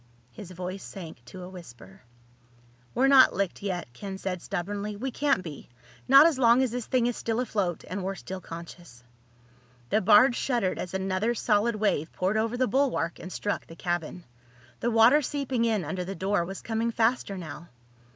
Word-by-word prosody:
His 205 -4 -10
voice 185 +1 -6
sank 165 -10 -9
to 180 +9 -10
a - - -7
whisper. 120 - -13 0.9
"We're 255 - +3
not 270 -1 +7
licked 195 -1 -2
yet," 180 -10 -4
Ken 195 +9 -7
said 185 -2 -4
stubbornly. 200 +3 -4
"We 260 +6 -4
can't 280 -8 +1
be—not 135 - +2
as 320 -5 +2
long 240 +1 +5
as 255 - -1
this 245 -1 -4
thing 250 -2 +2
is 245 -1 0
still 230 0 -2
afloat 205 -8 -1
and 185 +1 -4
we're 195 +1 -3
still 190 0 -7
conscious." 170 -7 -11 0.9
The 215 - +3
barge 220 +6 +6
shuddered 235 -9 -1
as 180 +1 -5
another 190 +5 0
solid 220 +1 +1
wave 200 -7 0
poured 190 +4 0
over 225 +2 0
the 255 0 +2
bulwark 255 - 0
and 185 - -8
struck 205 - -3
the 165 - -11
cabin. 175 0 -3 0.6
The 240 - 0
water 230 +6 +6
seeping 270 -4 -1
in 215 -7 0
under 180 +4 -3
the 195 +2 -6
door 190 0 0
was 195 +2 -8
coming 225 +1 -1
faster 230 -3 0
now. 170 -1 -8
200 Hz, 180 wpm, -27 LUFS, 180-235 Hz, 0.9 s, not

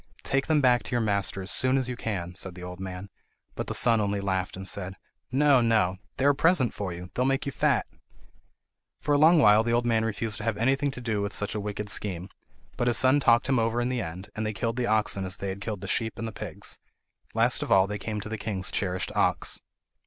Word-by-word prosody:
"Take 135 0 0
them 155 -1 +3
back 125 -2 +4
to - - -8
your 120 - +2
master 100 -3 0
as 95 - -3
soon 130 +1 +3
as 130 -2 -1
you 125 - -3
can," 90 -7 -4
said 90 0 -7
the 90 - -9
old 90 0 -8
man; 95 +1 -7 0.4
but - - -5
the - - -3
son 115 -2 +3
only 100 0 -1
laughed, 95 -2 -2
and 95 0 -6
said: 95 +1 -3 0.4
"No, 140 -1 +4
no; 105 -5 +2 0.2
they 135 - 0
are 145 - +7
a - - 0
present 145 - +2
to 100 -2 -4
you! 90 +1 -8
They - - -2
will 130 - +2
make 135 0 0
you 140 - -2
fat!" - - +1 1.1
For 145 - 0
a 145 - +4
long 165 +3 +6
while 105 -6 +6
the 115 0 0
old 120 0 +2
man 115 -2 +2
refused 110 0 -2
to - - -7
have 115 -3 -1
anything 135 +5 +1
to 135 -2 -7
do 110 -4 -1
with 100 -1 -3
such 105 +1 -2
a 105 - -2
wicked 105 0 -4
scheme; 95 -3 -2 0.5
but 120 - 0
his 120 - +3
son 130 +2 +4
talked 120 -4 +4
him 135 -3 +2
over 115 +1 0
in 120 +1 0
the 125 -2 -1
end, 90 +1 -7
and 110 - -2
they 110 0 -2
killed 115 +4 -2
the 125 -1 0
oxen 105 -2 +1
as 95 -1 -2
they 100 - -4
had 95 +1 -6
killed 105 -2 -4
the 100 - -6
sheep 110 +3 0
and 115 - -4
the - - -5
pigs. - - -8 0.6
Last - - +3
of - - -4
all 95 -1 +6
they 105 +1 -5
came 105 +1 -4
to 105 - -7
the 110 -1 -4
king's 95 -3 -3
cherished 95 -2 -1
ox. - - +1
110 Hz, 255 wpm, -27 LUFS, 95-125 Hz, 1.1 s, are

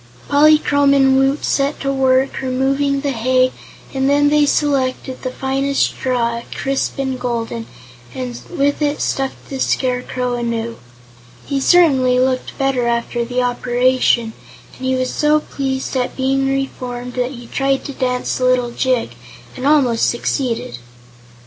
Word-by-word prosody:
Polychrome 285 -1 +4
and 270 -1 +4
Woot 270 +2 +2
set 280 +1 0
to 275 0 -1
work 265 0 +2
removing 275 +2 0
the 280 -1 -1
hay 255 +1 +2 0.4
and 265 0 +1
then 290 0 +4
they 295 0 +3
selected 265 -3 0
the 255 - -3
finest 270 +2 0
straw, 235 -2 -1
crisp 275 0 -2
and 265 -2 -2
golden, 235 -2 -3 0.5
and 250 -2 -5
with 285 -3 0
it 295 0 0
stuffed 270 -1 -3
the 270 - -4
Scarecrow 250 -1 -1
anew. 235 -1 -3 0.7
He 275 - -1
certainly 265 -5 +4
looked 255 0 -1
better 270 -3 0
after 235 0 -1
the 250 +1 -1
operation, 245 -1 +1 0.4
and 260 - -5
he 260 - +1
was 255 0 -1
so 300 0 +3
pleased 270 -2 -4
at 250 -1 -2
being 270 +1 +1
reformed 250 -2 -4
that 250 +1 -2
he 240 -1 -10
tried 270 +2 -1
to 280 - -5
dance 250 -1 -1
a 255 - +1
little 250 -1 +2
jig, 255 - 0 0.5
and 260 +2 -2
almost 265 -6 +3
succeeded. 240 - -2
260 Hz, 145 wpm, -18 LUFS, 250-275 Hz, 0.7 s, Polychrome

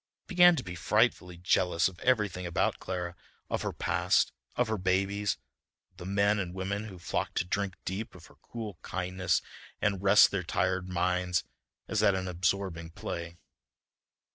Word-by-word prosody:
He - - -40
began 175 -2 +7
to 135 - -3
be 90 - -6
frightfully 90 0 +1
jealous 90 -1 +2
of 95 -2 -9
everything 105 -8 +1
about 85 - 0
Clara: 90 -1 -4 0.4
of - - 0
her - - -2
past, - - +1 0.2
of 125 - +2
her 110 -2 -1
babies, 95 +2 +1 0.5
of - - -34
the 85 - -8
men 100 +1 +2
and 90 -2 -4
women 100 +3 -2
who 100 -4 -9
flocked 85 - -3
to - - +1
drink 95 +1 -2
deep 105 +4 -4
of 90 - -13
her - - -19
cool 110 -7 -7
kindness 90 -1 -1 0.4
and 100 -3 0
rest 100 +1 +7
their 100 - -1
tired 90 +1 -1
minds 90 0 +1 0.4
as 110 -1 0
at 100 -2 +4
an 95 0 -2
absorbing 90 -2 -1
play. 85 0 -6
95 Hz, 165 wpm, -30 LUFS, 90-100 Hz, 0.5 s, began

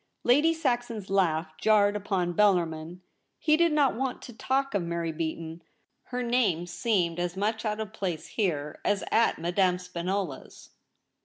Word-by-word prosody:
Lady 290 +7 +4
Saxon's 240 -10 -2
laugh 160 -4 +1
jarred 210 0 +4
upon 190 -4 -1
Bellarmin. 175 -3 +1 0.4
He 305 -1 +3
did 335 +1 +3
not 290 -5 +3
want 260 +1 -2
to 240 - -9
talk 270 +4 -1
of 200 - +1
Mary 170 -1 -2
Beaton. 160 +1 -5 0.4
Her 250 0 -3
name 235 -9 +1
seemed 175 -4 0
as 175 +1 -2
much 215 +3 -1
out 210 0 -1
of 215 -1 -5
place 180 -7 -4
here 155 -8 -2
as 205 -1 +1
at 230 - +3
Madame 180 +2 +1
Spinola's. 180 -3 -5
195 Hz, 150 wpm, -28 LUFS, 170-230 Hz, 0.4 s, Lady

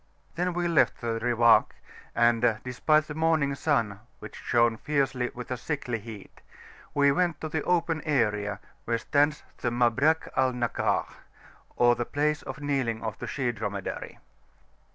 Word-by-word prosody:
Then 180 +1 -1
we 175 0 -1
left 170 -2 +2
the 115 -1 -2
Riwak, 120 -1 +4 0.4
and 120 -1 +3
despite 150 +5 +2
the 150 - -7
morning 160 -3 +1
sun 115 -9 0 0.2
which - - -10
shone 120 -1 +2
fiercely 135 -3 0
with 125 +1 -8
a 125 - -1
sickly 125 -6 -3
heat, 105 -2 -11 0.5
we 140 -1 +5
went 170 0 0
to 155 - -4
the 155 0 -1
open 165 -2 +1
area 105 - 0 0.3
where 115 0 0
stands 145 +5 +1 0.2
the 120 - 0
"Mabrak 125 +7 +2
al 130 -1 +2
Nakah," 120 -1 0 0.7
or 120 0 +5
the 120 0 -2
"Place 150 +3 0
of 135 +2 -8
kneeling 130 -6 -1
of 110 -1 -4
the - - -5
she 130 -4 -1
Dromedary. 100 -3 -5
125 Hz, 155 wpm, -27 LUFS, 115-150 Hz, 0.7 s, we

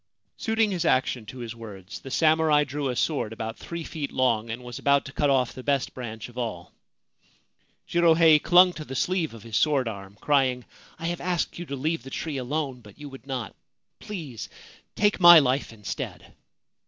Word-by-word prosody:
Suiting 225 -1 +1
his 175 -3 -1
action 130 -6 +1
to 130 - -9
his 120 -2 -6
words, 100 -5 -9
the 135 - -10
samurai 155 0 +3
drew 145 -1 -3
a 125 - -2
sword 140 -5 -1
about 110 0 -5
three 170 -1 -6
feet 150 -3 -5
long, 115 -4 +1
and 115 +2 -5
was 120 -1 -7
about 140 0 +3
to 135 - -8
cut 145 +1 +1
off 130 -3 +2
the 130 - -8
best 140 0 0
branch 110 -4 -7
of 125 0 -9
all. 105 -8 -5 1.1
Jirohei 165 -2 +5
clung 180 +1 +6
to 155 - -7
the 135 -3 -8
sleeve 170 -5 -1
of 110 - -12
his 115 -2 -6
sword 140 -5 +2
arm, 100 -2 -7
crying: 130 -4 +1 0.2
' - - -22
I 165 - -7
have 175 0 -2
asked 175 -1 -2
you 175 - -6
to 140 - -4
leave 155 +2 -1
the 130 - -10
tree 150 +1 -4
alone; 135 0 -3
but 105 -3 -16
you 145 -1 -9
would 135 0 -13
not. 130 -4 -4 0.4
Please 160 - -7 0.5
take 205 -1 +2
my 175 -1 +10
life 135 -3 +2
instead.' 105 -2 -7
135 Hz, 195 wpm, -26 LUFS, 120-160 Hz, 1.1 s, my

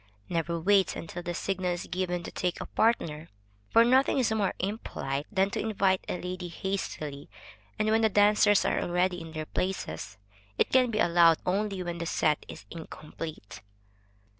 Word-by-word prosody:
Never 170 0 -1
wait 195 +2 +3
until 170 +2 -6
the 175 0 -4
signal 185 -1 -1
is 175 - -5
given 180 -1 -2
to - - -7
take 180 -1 -2
a - - -5
partner, 165 -9 0 0.4
for 230 +1 +6
nothing 260 +3 +4
is 250 -4 +2
more 210 -3 0
impolite 145 - -3
than 195 -1 +2
to - - -2
invite 195 -3 +1
a 180 - -2
lady 180 0 -5
hastily, 160 -6 -4 0.5
and 215 - 0
when 220 +1 +3
the 220 - +4
dancers 205 0 +4
are - - +1
already 180 0 0
in 165 -1 -9
their 155 -1 -4
places; 180 - -4 0.4
it - - +2
can 255 -1 +4
be 215 - -2
allowed 170 -5 +5
only 195 0 -1
when 175 -1 -4
the 170 - -3
set 150 -2 +1
is - - -10
incomplete. 155 -6 -8
180 Hz, 170 wpm, -28 LUFS, 165-205 Hz, 0.5 s, for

